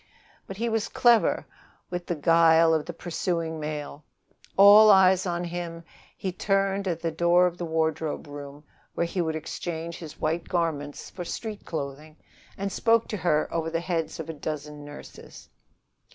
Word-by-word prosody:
But 195 Hz, -, -8 dB
he 235 Hz, +2 st, -1 dB
was 225 Hz, -1 st, 0 dB
clever 235 Hz, -2 st, +3 dB, 0.5 s
with 175 Hz, -1 st, -4 dB
the 175 Hz, -, -1 dB
guile 165 Hz, +1 st, +5 dB
of 155 Hz, -2 st, 0 dB
the -, -, -3 dB
pursuing 165 Hz, -1 st, -3 dB
male. 150 Hz, -1 st, -5 dB, 0.5 s
Eyes 195 Hz, -2 st, +7 dB
of -, -, 0 dB
all 175 Hz, -, -1 dB
on 175 Hz, -, -3 dB
him, 170 Hz, -1 st, -5 dB, 0.3 s
he 190 Hz, -, -3 dB
turned 195 Hz, +1 st, 0 dB
at 170 Hz, -2 st, -2 dB
the 165 Hz, -, -1 dB
door 170 Hz, +2 st, +4 dB
of 175 Hz, -1 st, -2 dB
the 175 Hz, -, -2 dB
wardrobe 160 Hz, -1 st, -1 dB
room, 145 Hz, 0 st, -9 dB, 0.3 s
where 170 Hz, -, +1 dB
he 175 Hz, +2 st, -2 dB
would 160 Hz, -2 st, -1 dB
exchange 165 Hz, +1 st, -5 dB
his 160 Hz, -3 st, -10 dB
white 165 Hz, +2 st, -2 dB
garments 155 Hz, -5 st, -2 dB
for 180 Hz, -, -6 dB
street 215 Hz, +4 st, -6 dB
clothing, 150 Hz, 0 st, -6 dB, 0.4 s
and 200 Hz, 0 st, -3 dB
spoke 230 Hz, +3 st, +2 dB
to 210 Hz, -, -3 dB
her 160 Hz, -4 st, +1 dB
over 165 Hz, -1 st, -1 dB
the 165 Hz, 0 st, -1 dB
heads 170 Hz, -2 st, -3 dB
of 160 Hz, -, -5 dB
a 165 Hz, -, -5 dB
dozen 150 Hz, -1 st, -6 dB
nurses. 145 Hz, 0 st, -12 dB
170 Hz, 170 wpm, -26 LUFS, 155-185 Hz, 0.5 s, Eyes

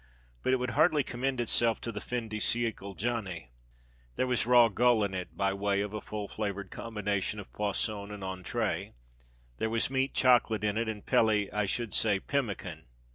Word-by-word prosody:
But -, -, +1 dB
it -, -, +5 dB
would 125 Hz, -1 st, -2 dB
hardly 155 Hz, -1 st, +4 dB
commend 130 Hz, +1 st, -2 dB
itself 115 Hz, -1 st, +2 dB
to 115 Hz, -, -3 dB
the 105 Hz, -2 st, -6 dB
fin 120 Hz, -2 st, -3 dB
de 110 Hz, 0 st, -4 dB
siècle 105 Hz, -4 st, -1 dB
"Johnny." 95 Hz, -, -3 dB, 0.6 s
There -, -, +1 dB
was 125 Hz, -3 st, +1 dB
raw 120 Hz, -1 st, +7 dB
gull 115 Hz, +1 st, +3 dB
in 100 Hz, -1 st, -1 dB
it, 90 Hz, -1 st, -5 dB
by 100 Hz, -1 st, +1 dB
way 100 Hz, 0 st, 0 dB
of 105 Hz, 0 st, -4 dB
a 105 Hz, -, -4 dB
full 105 Hz, -1 st, -5 dB
flavoured 100 Hz, -2 st, -4 dB
combination 105 Hz, -2 st, -2 dB
of 100 Hz, -, -10 dB
poisson 105 Hz, 0 st, -2 dB
and 105 Hz, -1 st, -7 dB
entrée; 95 Hz, -1 st, -2 dB, 0.7 s
there 110 Hz, -, 0 dB
was 115 Hz, +3 st, +1 dB
meat 135 Hz, 0 st, 0 dB
chocolate 120 Hz, -4 st, +4 dB
in 105 Hz, -1 st, +1 dB
it, 115 Hz, 0 st, 0 dB
and 105 Hz, -2 st, -6 dB
peli 105 Hz, -2 st, +3 dB
I 105 Hz, -1 st, +1 dB
should 115 Hz, +2 st, -2 dB
say, 105 Hz, -3 st, +3 dB
pemmican. 100 Hz, -, -3 dB
105 Hz, 185 wpm, -30 LUFS, 100-120 Hz, 0.7 s, raw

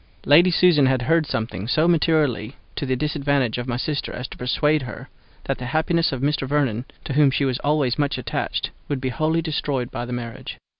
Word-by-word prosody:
Lady 170 Hz, +6 st, +6 dB
Susan 165 Hz, -5 st, +4 dB
had 130 Hz, -2 st, +1 dB
heard 160 Hz, +3 st, +2 dB
something 110 Hz, -5 st, -3 dB
so 155 Hz, +7 st, +2 dB
materially 150 Hz, -8 st, +1 dB, 0.2 s
to 140 Hz, -, -3 dB
the 130 Hz, -, +1 dB
disadvantage 140 Hz, -4 st, 0 dB
of 120 Hz, -, -5 dB
my 120 Hz, -1 st, -1 dB
sister 145 Hz, +3 st, -2 dB
as 125 Hz, +1 st, -5 dB
to -, -, -11 dB
persuade 150 Hz, +4 st, +1 dB
her 120 Hz, -2 st, -8 dB, 0.3 s
that -, -, -3 dB
the 125 Hz, -, -5 dB
happiness 165 Hz, +1 st, +2 dB
of 130 Hz, -2 st, -4 dB
Mr. 140 Hz, -1 st, 0 dB
Vernon, 130 Hz, -5 st, 0 dB, 0.2 s
to 140 Hz, -, -3 dB
whom 145 Hz, 0 st, +5 dB
she 140 Hz, +1 st, 0 dB
was 130 Hz, -1 st, -1 dB
always 145 Hz, -3 st, +1 dB
much 145 Hz, -1 st, 0 dB
attached, -, -, -3 dB, 0.2 s
would 145 Hz, -2 st, -1 dB
be 130 Hz, 0 st, -2 dB
wholly 155 Hz, +6 st, 0 dB
destroyed 145 Hz, -5 st, -2 dB
by -, -, -4 dB
the 125 Hz, -, -8 dB
marriage. 120 Hz, -1 st, -6 dB
140 Hz, 205 wpm, -22 LUFS, 125-155 Hz, 0.3 s, Lady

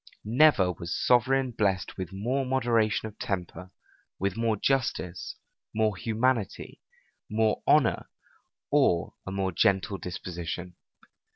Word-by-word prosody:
Never 115 Hz, -5 st, +4 dB
was 85 Hz, -1 st, -5 dB
sovereign 130 Hz, +1 st, +3 dB
blessed 100 Hz, -5 st, -1 dB
with 95 Hz, -1 st, -5 dB
more 120 Hz, +8 st, -1 dB
moderation 120 Hz, -5 st, +1 dB
of 110 Hz, 0 st, -13 dB
temper, 90 Hz, -2 st, -4 dB, 0.5 s
with 100 Hz, 0 st, -1 dB
more 115 Hz, -1 st, 0 dB
justice, 100 Hz, -8 st, -1 dB, 0.4 s
more 110 Hz, -2 st, +2 dB
humanity, 115 Hz, 0 st, -1 dB, 0.5 s
more 110 Hz, 0 st, +1 dB
honor, 145 Hz, -6 st, +3 dB, 0.6 s
or 135 Hz, -, +2 dB
a -, -, -3 dB
more 95 Hz, -1 st, -1 dB
gentle 95 Hz, +2 st, +1 dB
disposition. 90 Hz, 0 st, -6 dB
105 Hz, 110 wpm, -28 LUFS, 95-120 Hz, 0.6 s, Never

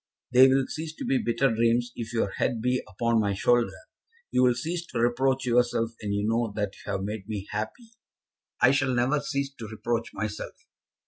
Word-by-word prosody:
"They 130 Hz, +1 st, +8 dB
will 135 Hz, 0 st, +3 dB
cease 160 Hz, 0 st, -6 dB
to -, -, -6 dB
be 135 Hz, -, +2 dB
bitter 120 Hz, +2 st, +1 dB
dreams 115 Hz, +2 st, +2 dB
if 115 Hz, -1 st, -5 dB
your 115 Hz, -4 st, 0 dB
head 115 Hz, -, -1 dB
be 125 Hz, +2 st, +1 dB
upon 115 Hz, +3 st, +1 dB
my 100 Hz, -2 st, +1 dB
shoulder. 120 Hz, +4 st, +2 dB, 0.5 s
You -, -, +3 dB
will 125 Hz, -1 st, +4 dB
cease 165 Hz, +8 st, -3 dB
to 120 Hz, -, -4 dB
reproach 130 Hz, +3 st, +1 dB
yourself 120 Hz, -2 st, +2 dB
when 105 Hz, -2 st, -3 dB
you 100 Hz, +1 st, 0 dB
know 115 Hz, 0 st, +1 dB
that 105 Hz, -2 st, -2 dB
you -, -, -8 dB
have 95 Hz, -, -2 dB
made 105 Hz, 0 st, -5 dB
me 105 Hz, -2 st, -4 dB
happy." 110 Hz, -, -5 dB, 0.7 s
"I 125 Hz, -, +6 dB
shall 130 Hz, -2 st, +1 dB
never 125 Hz, +5 st, +2 dB
cease 140 Hz, -1 st, -3 dB
to 115 Hz, -5 st, -8 dB
reproach 115 Hz, +2 st, -3 dB
myself. 110 Hz, -1 st, -5 dB
120 Hz, 195 wpm, -27 LUFS, 110-130 Hz, 0.7 s, They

